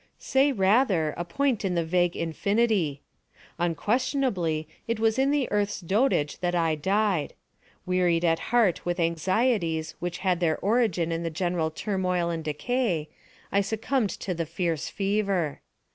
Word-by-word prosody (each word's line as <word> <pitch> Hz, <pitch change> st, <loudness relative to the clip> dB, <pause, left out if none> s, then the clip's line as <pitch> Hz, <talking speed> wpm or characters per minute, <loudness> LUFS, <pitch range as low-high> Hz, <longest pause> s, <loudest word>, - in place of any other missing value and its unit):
Monos. -, -, -17 dB
Say, 270 Hz, +2 st, +3 dB
rather, 195 Hz, -, +2 dB
a 175 Hz, -, -3 dB
point 240 Hz, +7 st, 0 dB
in 185 Hz, -2 st, 0 dB
the 170 Hz, -1 st, 0 dB
vague 175 Hz, +1 st, +1 dB
infinity. 180 Hz, -3 st, 0 dB, 0.6 s
Unquestionably, 175 Hz, -, 0 dB, 0.2 s
it 230 Hz, -1 st, -1 dB
was 225 Hz, +2 st, +2 dB
in 270 Hz, +1 st, +3 dB
the 285 Hz, -3 st, +1 dB
Earth's 205 Hz, 0 st, 0 dB
dotage 190 Hz, -, +1 dB
that 175 Hz, -1 st, -1 dB
I 165 Hz, -2 st, +2 dB
died. 190 Hz, +1 st, 0 dB, 0.5 s
Wearied 180 Hz, -2 st, +2 dB
at 165 Hz, -1 st, +2 dB
heart 225 Hz, -7 st, +3 dB
with 175 Hz, +1 st, -2 dB
anxieties 170 Hz, -1 st, 0 dB
which 175 Hz, -1 st, -3 dB
had 180 Hz, -2 st, +2 dB
their 165 Hz, -3 st, +1 dB
origin 200 Hz, -6 st, +1 dB
in 165 Hz, 0 st, -2 dB
the 165 Hz, -, -2 dB
general 175 Hz, -1 st, -1 dB
turmoil 180 Hz, -1 st, -1 dB
and 165 Hz, -1 st, -3 dB
decay, 165 Hz, -, -1 dB, 0.4 s
I 200 Hz, -, +3 dB
succumbed 220 Hz, +3 st, -1 dB
to 185 Hz, -, -2 dB
the 165 Hz, -2 st, -3 dB
fierce 165 Hz, -2 st, -2 dB
fever. 195 Hz, -6 st, -1 dB
180 Hz, 150 wpm, -26 LUFS, 165-215 Hz, 0.6 s, Say